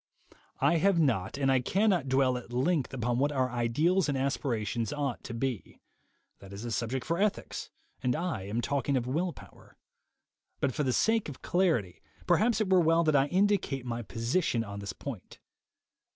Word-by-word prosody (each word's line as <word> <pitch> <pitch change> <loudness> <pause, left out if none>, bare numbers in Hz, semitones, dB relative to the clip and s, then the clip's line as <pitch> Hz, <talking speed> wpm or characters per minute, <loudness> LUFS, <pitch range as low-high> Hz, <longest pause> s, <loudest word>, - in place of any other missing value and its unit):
I 170 - +3
have 190 +1 +3
not 125 - +1
and 135 -1 +2
I 130 - +4
cannot 185 - +1
dwell 130 -1 +3
at 125 -1 -7
length 135 +4 0
upon 120 -2 -1
what 145 +2 +2
our 130 -3 0
ideals 150 +10 +1
and 140 - 0
aspirations 120 -5 -1
ought 140 -4 -3
to 115 - -6
be; 125 -2 -4 0.6
that 100 -1 -13
is 100 +4 -7
a 120 - -4
subject 120 +3 -2
for 170 +2 -1
ethics, 210 0 -1 0.3
and 125 -1 +1
I 160 - -3
am 110 +4 -1
talking 140 +2 0
of 120 - -1
will 165 +8 -1
power. - - -16 0.8
But 135 -3 0
for - - -2
the 130 -3 +1
sake 220 - +2
of 140 - -10
clarity, 160 - +1 0.2
perhaps 225 -1 +3
it 215 -3 0
were 185 -1 +6
well 165 +1 +3
that 155 -2 +2
I 135 0 +4
indicate 185 -8 +1
my 120 -1 -3
position 115 - -1
on 100 -2 -7
this 100 -2 -5
point. 115 -3 -8
135 Hz, 180 wpm, -29 LUFS, 120-170 Hz, 0.8 s, were